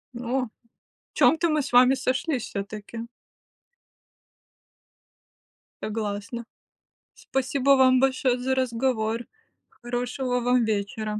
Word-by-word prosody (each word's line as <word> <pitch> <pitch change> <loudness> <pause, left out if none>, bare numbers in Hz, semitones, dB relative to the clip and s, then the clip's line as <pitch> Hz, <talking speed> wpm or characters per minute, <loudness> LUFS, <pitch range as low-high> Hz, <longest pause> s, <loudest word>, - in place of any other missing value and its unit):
О. 250 +2 -1
В - - -13 0.7
чём-то 330 +1 +4
мы 305 -2 +1
с 280 - -7
вами 250 +2 +6
сошлись 260 +1 -1
всё-таки. 210 +3 -6 2.8
Согласна. 215 +2 -4 0.7
Спасибо 270 +1 0
вам 255 -1 +5
большое 260 -1 +2
за 260 +1 0
разговор. 235 -2 -1 0.4
Хорошего 245 +1 -3
вам 245 0 +2
вечера. 215 0 -2
245 Hz, 90 wpm, -25 LUFS, 225-260 Hz, 2.8 s, вами